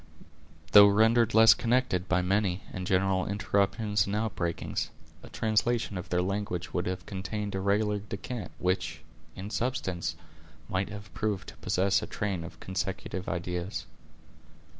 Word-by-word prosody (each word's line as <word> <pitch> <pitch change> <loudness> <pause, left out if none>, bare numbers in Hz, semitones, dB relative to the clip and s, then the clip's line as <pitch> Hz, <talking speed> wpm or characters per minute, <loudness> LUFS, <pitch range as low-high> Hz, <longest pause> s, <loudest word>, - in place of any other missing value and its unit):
Though 100 0 +10
rendered 110 +3 +4
less 110 0 +9
connected 120 -7 0
by 90 0 +2
many 95 0 +1
and 90 -1 -4
general 95 -1 +2
interruptions 100 0 +1
and 100 - -1
outbreakings, 100 -6 -2 0.3
a - - -12
translation 110 0 0
of 90 - -5
their 90 0 +1
language 95 -2 -3
would 90 - -1
have 90 -2 -3
contained 100 +1 -4
a 95 - -1
regular 105 +1 +1
descant, 105 0 -6
which, 90 -3 -1 0.3
in 100 +3 -7
substance, 95 -11 -2 0.5
might 95 +1 -1
have 105 -2 -9
proved 105 -3 -2
to - - -13
possess 95 +1 +1
a - - -5
train 100 -5 -2
of 85 - -10
consecutive 95 0 -4
ideas. 85 -2 -3
100 Hz, 140 wpm, -29 LUFS, 90-105 Hz, 0.5 s, Though